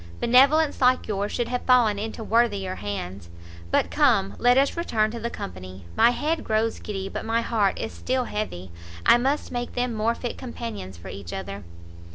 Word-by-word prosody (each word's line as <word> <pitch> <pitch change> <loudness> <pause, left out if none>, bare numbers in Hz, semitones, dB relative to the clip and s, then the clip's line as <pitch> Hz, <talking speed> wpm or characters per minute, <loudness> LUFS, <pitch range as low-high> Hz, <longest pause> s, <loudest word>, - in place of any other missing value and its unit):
benevolence 275 +6 +4
like 255 0 +3
yours 205 -1 -2
should 240 -1 -1
have 250 0 -2
fallen 235 -5 +4
into 220 +1 -5
worthier 210 -5 +1
hands. 100 - -6 0.4
But - - +1
come, 100 - +3
let 245 +1 +4
us 275 +1 +3
return 220 -11 0
to 235 - -6
the 235 +1 -3
company. 95 - -8
My - - +6
head 305 +6 -1
grows 220 +1 0
giddy, 195 -2 -5
but - - -5
my 225 +1 +1
heart 215 -4 +1
is 225 - -4
still 255 0 -1
heavy; 95 - -5 0.3
I 240 - +7
must 275 +4 -1
make 245 -1 -4
them 245 -1 0
more 225 +2 0
fit 240 - -5
companions 230 - -6
for 85 - -10
each 95 -4 -8
other." 100 +1 -6
225 Hz, 185 wpm, -25 LUFS, 190-245 Hz, 0.4 s, I